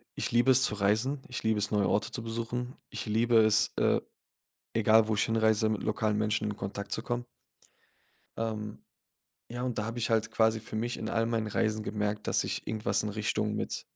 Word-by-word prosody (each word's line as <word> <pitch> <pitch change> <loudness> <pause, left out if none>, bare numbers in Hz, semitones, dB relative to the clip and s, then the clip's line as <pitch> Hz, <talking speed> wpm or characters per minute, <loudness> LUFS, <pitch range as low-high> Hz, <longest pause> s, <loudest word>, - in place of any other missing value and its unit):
Ich - - -2
liebe 120 +3 +4
es, 130 +1 +6
zu 105 - +1
reisen. 110 +8 +1
Ich 125 - -5
liebe 110 -1 +2
es, 105 +2 -1
neue 100 -2 +2
Orte 105 - 0
zu 120 - -4
besuchen. 120 +2 -4
Ich - - -5
liebe 115 +2 +3
es, 110 0 +4
äh, - - +3 0.7
egal 110 0 +5
wo 110 - +2
ich 105 - +2
hinreise, 110 -1 +2
mit 110 - -2
lokalen 110 -1 0
Menschen 105 0 0
in 105 - -4
Kontakt 100 +1 -5
zu 110 - -3
kommen 120 0 -3 1.1
ähm, 110 -2 -3 0.7
ja, 120 +1 -5
und 125 -3 -2
da 105 - 0
habe 115 +2 -4
ich 115 - -1
halt 110 0 +1
quasi 110 0 +3
für 110 0 -8
mich 120 +2 -2
in - - -5
all 115 0 +1
meinen 115 -2 -1
Reisen 110 +1 0
gemerkt, 105 0 -2
dass - - +2
ich - - -4
irgendwas 105 -2 0
in 105 - -2
Richtung 105 0 -1
mit - - -3
110 Hz, 205 wpm, -30 LUFS, 105-115 Hz, 1.1 s, es